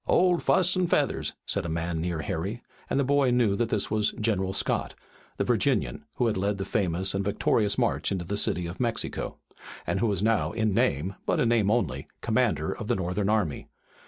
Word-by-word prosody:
"Old 180 -1 +3
Fuss 185 0 +3
and 180 -2 +1
Feathers," - - 0
said - - 0
a 85 - -4
man 80 0 -2
near 85 -2 -2
Harry, 100 +6 -3 0.3
and - - +1
the - - +3
boy 140 0 +3
knew 120 -5 +3
that 115 +1 0
this 105 -2 0
was 105 -1 +1
General 100 -4 0
Scott, 95 - -1 0.4
the - - +1
Virginian, - - 0
who 125 - +1
had 110 -4 +1
led 100 +2 0
the 95 - -3
famous 95 -2 0
and 100 0 -1
victorious 105 +1 +1
march 120 -4 +1
into 90 -3 -2
the 100 +4 -2
City 90 -3 0
of 85 +2 -7
Mexico, 115 -3 -2 0.5
and - - -1
who 115 - +2
was 100 -2 -1
now 110 -1 +2
in 110 -2 +1
name, 90 +1 +1
but - - +2
in 115 - +3
name 110 -4 +3
only, 80 - 0
commander - - +1
of - - -6
the - - +2
Northern 95 +2 -1
army. 105 -9 0
100 Hz, 205 wpm, -27 LUFS, 90-115 Hz, 0.5 s, Old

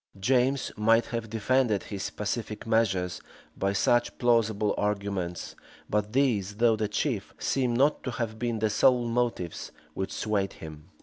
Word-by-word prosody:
James 130 +5 +2
might 115 +2 +3
have 115 -2 -4
defended 115 -1 +1
his 100 -2 -4
pacific 105 +1 -4
measures 95 -6 +1 0.3
by 100 0 0
such 120 +5 +2
plausible 110 -4 +2
arguments; 100 -4 -2 0.3
but 105 0 -1
these, 110 -8 +1
though 115 +1 +4
the 110 -1 -1
chief, 105 - -2
seem 125 -3 0
not 140 +5 +3
to - - -3
have 115 -3 -4
been 120 -1 -1
the 110 0 +1
sole 120 +3 +4
motives 115 -8 -2 0.2
which 95 - -3
swayed 100 -3 -1
him. 75 +1 -11
110 Hz, 145 wpm, -28 LUFS, 100-120 Hz, 0.3 s, though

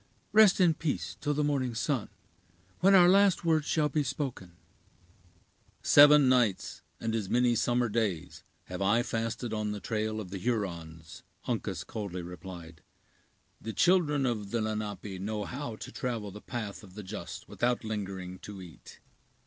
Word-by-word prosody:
Rest 210 -3 +6
in 175 -3 +5
peace 90 - -3
till 145 0 0
the 150 - +1
morning 135 -5 0
sun, 125 -1 -1 0.7
when 195 +2 +6
our 180 -2 +8
last 195 -1 +4
words 155 -2 +2
shall 155 -2 +2
be 150 +1 0
spoken." 130 - -4 1.3
"Seven 145 -1 +8
nights, 120 -7 +1 0.2
and 115 0 -2
as 110 -4 -2
many 125 0 +3
summer 120 +1 +1
days, 105 -7 -2 0.2
have 90 +1 -7
I 105 +5 +3
fasted 115 0 -3
on 105 -1 -2
the 105 - -5
trail 110 +1 -2
of 95 -4 -7
the 95 - -4
Hurons," 85 -8 -4 0.2
Uncas - - -2
coldly 95 -5 -5
replied; 85 -2 -9 0.8
"the 110 - -5
children 155 - +3
of 110 -5 -2
the 115 - -1
Lenape 105 -3 -4
know 105 +1 -3
how 125 +1 -5
to - - -9
travel 115 -5 -3
the 105 +2 -10
path 110 -5 -5
of 95 -2 -14
the 105 - -7
just 95 -3 -7
without 120 0 0
lingering 95 -4 -5
to 105 -2 -9
eat." 90 -4 -13
110 Hz, 155 wpm, -30 LUFS, 100-135 Hz, 1.3 s, our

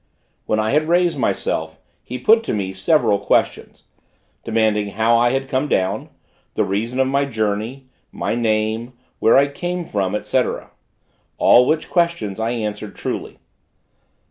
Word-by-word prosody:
When 110 - +1
I 110 0 0
had 155 +2 +2
raised 175 -3 +2
myself, 80 -8 -2 0.2
he 125 - -6
put 225 - +4
to - - -1
me 95 -2 -3
several 100 +1 +2
questions 100 - -1 0.6
demanding 110 -2 +1
how 115 +1 +3
I 120 +1 +4
had 135 +2 -1
come 135 +2 -1
down? 95 -4 -1 0.5
the - - +2
reason 115 +7 -2
of 130 - +4
my 140 +1 +1
journey 110 +2 -3 0.3
my - - -2
name 110 +1 -1 0.3
where 115 - +5
I 140 +1 +5
came 175 +5 -4
from, 100 -4 -1
&c., - - +2 0.9
all 125 +1 +5
which 155 0 0
questions 170 - 0
I 110 +1 0
answered 105 -3 -4
truly. - - -5
115 Hz, 145 wpm, -20 LUFS, 105-140 Hz, 0.9 s, where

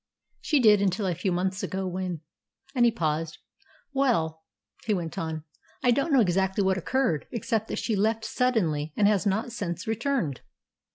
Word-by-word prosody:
"She 300 - +2
did 210 -4 +6
until 200 +1 +1
a 180 - +1
few 185 +3 -1
months 185 +2 -1
ago, 190 0 -3
when 180 -3 -3 0.2
" - - -32
and 245 -3 +4
he 235 - +5
paused. 160 -5 -2 0.6
"Well," 165 - +1 0.4
he 215 -3 +1
went 170 -3 -4
on, 160 -1 -3 0.4
"I 245 - +5
don't 275 +6 +1
know 270 -3 +6
exactly 190 0 +1
what 190 0 +2
occurred, 215 - 0
except 225 -1 -1
that - - -4
she 225 - -1
left 220 +2 +1
suddenly, 165 -12 0
and 205 - +5
has 205 -1 +2
not 215 +5 0
since 180 -7 -4
returned." 225 - -1
195 Hz, 175 wpm, -27 LUFS, 175-230 Hz, 0.6 s, did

